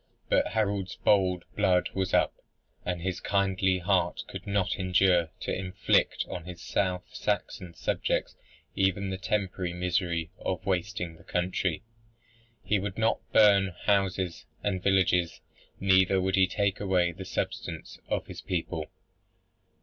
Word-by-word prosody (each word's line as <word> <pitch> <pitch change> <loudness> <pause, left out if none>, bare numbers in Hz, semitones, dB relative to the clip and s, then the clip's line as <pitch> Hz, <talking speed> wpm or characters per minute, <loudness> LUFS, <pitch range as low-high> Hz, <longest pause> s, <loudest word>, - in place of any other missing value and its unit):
But - - +2
Harold's 100 -3 0
bold 95 -3 +2
blood 95 -3 +3
was 95 -1 -1
up, - - +3 0.5
and 90 -1 -3
his 95 -1 -2
kindly 95 -1 +1
heart 90 -2 +1
could - - -8
not 100 -2 0
endure 90 -2 +3
to - - -2
inflict 95 +1 +1
on 90 - -6
his 90 -1 -8
South 90 +3 -1
Saxon 90 -2 -3
subjects - - -1 0.4
even 95 0 +1
the 95 - -4
temporary 95 -2 -1
misery 85 -2 -1
of 95 +1 -3
wasting 90 -3 -2
the - - -18
country. 90 -1 -1 0.8
"He 105 - +1
would 95 0 -4
not 110 0 +2
burn 100 -4 +5
houses 95 -5 +1 0.2
and 95 -3 -1
villages, 90 -3 +2 0.4
neither 95 0 +4
would 95 +1 0
he 95 -1 +5
take 100 0 0
away 90 -3 +2
the 95 +3 -8
substance 85 -3 -4
of - - -1
his - - -9
people." 80 -3 -3
95 Hz, 135 wpm, -28 LUFS, 90-95 Hz, 0.8 s, burn